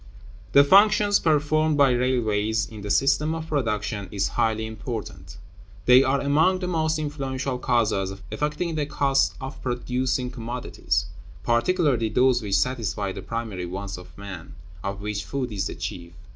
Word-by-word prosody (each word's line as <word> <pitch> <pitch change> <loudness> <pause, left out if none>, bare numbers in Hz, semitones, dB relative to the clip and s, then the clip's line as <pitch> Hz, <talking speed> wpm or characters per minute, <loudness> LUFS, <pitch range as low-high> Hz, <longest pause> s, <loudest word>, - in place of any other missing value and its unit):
The 140 - +8
functions 205 +4 +5
performed 155 0 +2
by 140 -2 +5
railways 115 -3 +1
in 110 -2 -10
the 105 - -6
system 150 +7 +2
of 160 0 -6
production 105 -7 -2
is 100 -1 0
highly 110 0 0
important. 110 -3 -7 0.5
They 125 +1 +8
are 135 +1 +1
among 155 +7 +3
the 185 -1 -4
most 160 -2 0
influential 135 -3 -3
causes 105 -6 0
affecting 155 +3 -2
the 150 -2 -1
cost 140 -1 +1
of 135 +1 -7
producing 125 0 -1
commodities, 120 0 -2 0.4
particularly 120 -2 +2
those 125 +2 +3
which 100 -2 +1
satisfy 105 -6 -1
the - - -7
primary 110 -6 -4
wants 100 +2 -5
of 90 0 -13
man, 100 -5 -9 0.3
of 100 0 -4
which 105 0 -3
food 130 -3 -3
is 100 -2 -2
the - - -6
chief. 85 -1 -6
125 Hz, 150 wpm, -24 LUFS, 105-145 Hz, 0.5 s, The